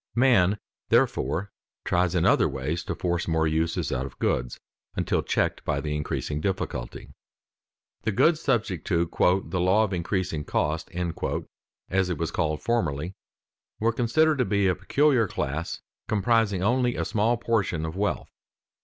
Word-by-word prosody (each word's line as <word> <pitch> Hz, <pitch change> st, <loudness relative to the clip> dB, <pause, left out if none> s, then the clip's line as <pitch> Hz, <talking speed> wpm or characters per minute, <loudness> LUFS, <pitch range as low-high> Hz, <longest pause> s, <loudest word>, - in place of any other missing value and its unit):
Man 110 Hz, -6 st, +4 dB, 0.3 s
therefore 95 Hz, +4 st, +1 dB, 0.3 s
tries 90 Hz, 0 st, +1 dB
in 85 Hz, -, +2 dB
other -, -, +4 dB
ways 70 Hz, +5 st, -3 dB
to -, -, -3 dB
force 85 Hz, -1 st, -1 dB
more 80 Hz, -1 st, +2 dB
uses 80 Hz, +1 st, 0 dB
out 65 Hz, +1 st, -1 dB
of -, -, -14 dB
goods, -, -, -1 dB, 0.4 s
until -, -, 0 dB
checked -, -, 0 dB
by -, -, -1 dB
the 75 Hz, -1 st, -3 dB
increasing 75 Hz, 0 st, -3 dB
difficulty. 75 Hz, -9 st, -4 dB, 0.9 s
The 110 Hz, -, 0 dB
goods 155 Hz, -, +3 dB
subject 110 Hz, -, 0 dB
to 85 Hz, -1 st, +2 dB, 0.4 s
"the 90 Hz, -, -3 dB
law 95 Hz, +5 st, +4 dB
of 105 Hz, -3 st, -2 dB
increasing 90 Hz, -3 st, -1 dB
cost," 80 Hz, +2 st, -1 dB
as 90 Hz, +1 st, -3 dB
it 90 Hz, -, -1 dB
was 85 Hz, +2 st, -2 dB
called 75 Hz, -4 st, -1 dB
formerly, 85 Hz, -8 st, -1 dB, 0.7 s
were 115 Hz, +1 st, +2 dB
considered 150 Hz, +6 st, +2 dB
to -, -, +4 dB
be 100 Hz, -2 st, +1 dB
a 90 Hz, -, +3 dB
peculiar 135 Hz, 0 st, +2 dB
class 75 Hz, 0 st, -3 dB, 0.2 s
comprising 105 Hz, -2 st, +2 dB
only 125 Hz, +3 st, +2 dB
a -, -, -1 dB
small 110 Hz, +3 st, +1 dB
portion 105 Hz, -9 st, 0 dB
of 80 Hz, +1 st, -5 dB
wealth. 100 Hz, +1 st, -2 dB
90 Hz, 150 wpm, -26 LUFS, 80-110 Hz, 0.9 s, Man